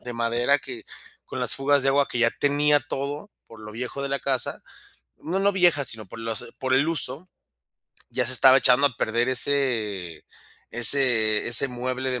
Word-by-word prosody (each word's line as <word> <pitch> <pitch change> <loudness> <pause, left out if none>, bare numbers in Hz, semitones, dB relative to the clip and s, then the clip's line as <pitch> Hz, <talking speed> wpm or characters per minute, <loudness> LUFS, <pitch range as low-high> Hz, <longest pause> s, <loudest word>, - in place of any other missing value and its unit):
de 125 - -7
madera 120 +4 0
que, 125 -4 -10 0.4
con - - -7
las - - +1
fugas 140 0 +2
de 135 - +3
agua 140 0 +1
que 125 - -5
ya 115 0 +3
tenía 145 +1 +1
todo, 145 +6 -6 0.2
por 115 -1 -15
lo 105 - -10
viejo 125 +4 -6
de 140 - -3
la 140 0 -2
casa 130 -3 0 0.6
no, 180 +4 -3
no 200 +1 +2
vieja, 175 -7 +2
sino 110 -3 -7
por 115 - -12
los 115 -1 -4
por 130 -1 -1
el 140 +4 +3
uso, 165 +1 -1 0.8
ya 125 +1 -1
se 130 - +2
estaba 130 +1 +6
echando 130 +2 +3
a 125 - -3
perder 120 +3 -1
ese 115 - -2 0.5
ese 120 -3 +2
ese 120 +4 -1
mueble 130 +1 -4
de 125 - -3
130 Hz, 185 wpm, -24 LUFS, 115-140 Hz, 0.8 s, estaba